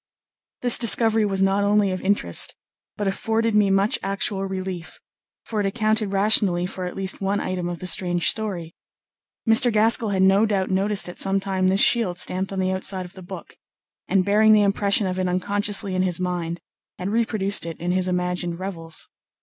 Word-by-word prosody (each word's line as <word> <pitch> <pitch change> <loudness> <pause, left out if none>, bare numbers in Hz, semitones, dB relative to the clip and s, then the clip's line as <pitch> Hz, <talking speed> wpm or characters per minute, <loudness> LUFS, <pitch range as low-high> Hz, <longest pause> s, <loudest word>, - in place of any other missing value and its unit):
This 245 -1 +5
discovery 225 -2 +4
was 195 -1 0
not 195 +1 +1
only 205 -1 +2
of 185 - -4
interest, 190 - +1 0.4
but 205 - -2
afforded 225 +3 -1
me 210 -1 +3
much 195 +2 +1
actual 195 0 -1
relief; 185 -2 -6 0.5
for 220 - -4
it 205 - -1
accounted 215 0 -1
rationally 195 -3 +3
for 185 0 -5
at 180 - -6
least 190 0 -2
one 195 +1 -1
item 180 -1 -4
of 175 - -5
the 185 - -9
strange 175 -1 0
story. 185 -7 -1 0.7
Mr. 225 +2 +5
Gaskell 220 +1 +2
had 190 -1 +1
no 195 +3 +4
doubt 195 -3 -1
noticed 195 +1 0
at 175 - -9
some 195 0 +1
time 190 -1 -1
this 190 +1 +3
shield 215 -8 +3
stamped 185 +2 0
on 195 - -5
the 185 0 0
outside 190 0 -1
of 180 - -13
the 190 - -12
book, 180 -1 -10 0.5
and 190 -2 +1
bearing 215 +2 +4
the 210 -1 +4
impression 200 +1 +1
of 185 0 -3
it 185 - -1
unconsciously 200 +2 -1
in 185 - 0
his 180 -2 -1
mind, 175 -2 -3 0.4
had 185 +2 -4
reproduced 215 -3 0
it 165 - -7
in 175 +1 -2
his 185 0 0
imagined 180 -1 -2
revels. 170 -4 -6
195 Hz, 190 wpm, -22 LUFS, 185-205 Hz, 0.7 s, This